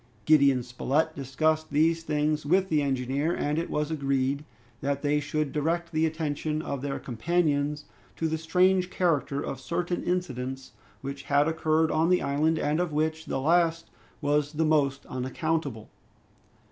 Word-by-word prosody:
Gideon 140 -4 +5
Spilett 140 +6 -1
discussed 155 +4 0
these 160 +3 +2
things 150 -1 0
with 185 +6 +2
the 155 -2 +2
engineer, 140 +4 0
and 150 +2 0
it 170 - -3
was 150 +1 -1
agreed 140 -1 0 0.4
that 140 +1 -1
they 145 0 +2
should 150 0 -2
direct 170 +3 -1
the 160 0 +2
attention 155 -1 -2
of 140 -4 -4
their 140 0 -3
companions 150 +2 0 0.3
to 165 - -1
the 160 0 -2
strange 180 +3 +3
character 150 -7 0
of 130 - -5
certain 175 +3 -2
incidents 135 -7 -3 0.3
which 140 +1 -5
had 145 +1 +3
occurred 160 0 +1
on 160 +2 +2
the 180 - +3
island, 150 +3 +1
and 150 +1 0
of 180 -2 0
which 160 +1 -1
the 135 - -1
last 165 +3 +2 0.3
was 145 0 +1
the 160 +1 +1
most 140 -3 +1
unaccountable. 130 -2 -3
150 Hz, 155 wpm, -27 LUFS, 140-160 Hz, 0.4 s, Gideon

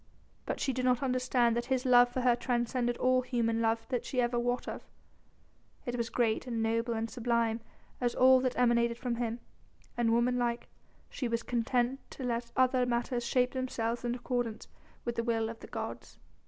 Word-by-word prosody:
But - - -2
she 270 - 0
did 255 +1 -2
not 250 +1 +2
understand 250 -2 +2
that 240 0 -1
his 260 -1 0
love 245 -1 +6
for 255 - -2
her 245 -1 +4
transcended 240 0 -1
all 255 0 +3
human 230 -3 0
love 225 0 +1 0.2
she 255 - -3
ever 240 0 +1
wot 245 +1 -1
of; - - -5 1.0
it 245 - -2
was 235 -1 -2
great 235 0 0
and 230 -2 -1
noble 230 +1 0
and 225 +1 -1
sublime 235 -1 0 0.4
as 245 -1 0
all 260 0 +6
that 255 -1 -1
emanated 235 -1 +3
from 240 -1 -2
him, 235 0 -2 0.5
and, 240 -1 +1
womanlike, 240 0 +1 0.4
she 255 - -3
was 230 0 -1
content 245 +2 0
to 265 - -8
let 235 -1 -2
other 255 -1 +3
matters 240 0 -1
shape 250 +1 +2
themselves 240 -3 -2
in 240 0 -1
accordance 245 -3 -3 0.4
with 235 -1 -3
the 230 - +1
will 225 -1 0
of 230 0 -8
the - - -10
gods. - - -6
240 Hz, 180 wpm, -31 LUFS, 235-250 Hz, 1.0 s, love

